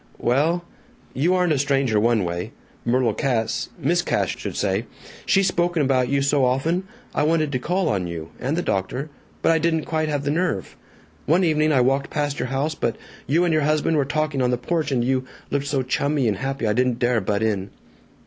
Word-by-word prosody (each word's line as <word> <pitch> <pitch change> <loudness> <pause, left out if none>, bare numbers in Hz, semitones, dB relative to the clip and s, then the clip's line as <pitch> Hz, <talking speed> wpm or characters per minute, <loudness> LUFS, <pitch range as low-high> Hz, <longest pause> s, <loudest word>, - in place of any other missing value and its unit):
"Well 160 +8 +1 0.5
You 170 +8 +2
aren't 180 -3 +2
a 140 - 0
stranger, 135 -5 +2
one 115 -1 +2
way. 85 0 -4 0.3
Myrtle 120 -2 +2
Cass 115 -1 -1
Miss 170 +3 +1
Cass, - - 0
should - - -5
say - - -1 0.4
she's 195 -1 +4
spoken 175 -3 +1
about 130 -2 +2
you 140 0 +1
so 140 0 +2
often. 160 +9 +1 0.3
I - - 0
wanted 155 -1 +2
to 130 - -1
call 180 +6 0
on 95 - 0
you 80 -1 -6
and 135 +6 -1
the 175 - 0
doctor 125 +10 -2 0.3
but - - +5
I 165 - +3
didn't 160 -1 +1
quite 155 -1 -1
have 145 -2 -1
the 145 - 0
nerve. 160 - -1 0.5
One 170 +5 +4
evening 155 -2 +2
I 135 -4 +4
walked 135 +2 +1
past 145 -1 -2
your 125 - -1
house, 135 +4 -1
but 120 -6 -1 0.3
you 165 +6 +3
and 170 - +1
your 155 - +3
husband 155 +2 +1
were 145 - +3
talking 155 -1 -1
on 125 - +2
the 125 - +1
porch, 155 +3 -1
and 120 -3 +1
you 130 0 0 0.3
looked 140 0 -1
so 140 -2 0
chummy 140 +1 0
and 105 -3 0
happy 135 +1 -3
I 105 - +2
didn't 125 0 +1
dare 120 -2 +1
butt 100 +3 -1
in." 100 -3 -1
140 Hz, 210 wpm, -23 LUFS, 125-155 Hz, 0.5 s, but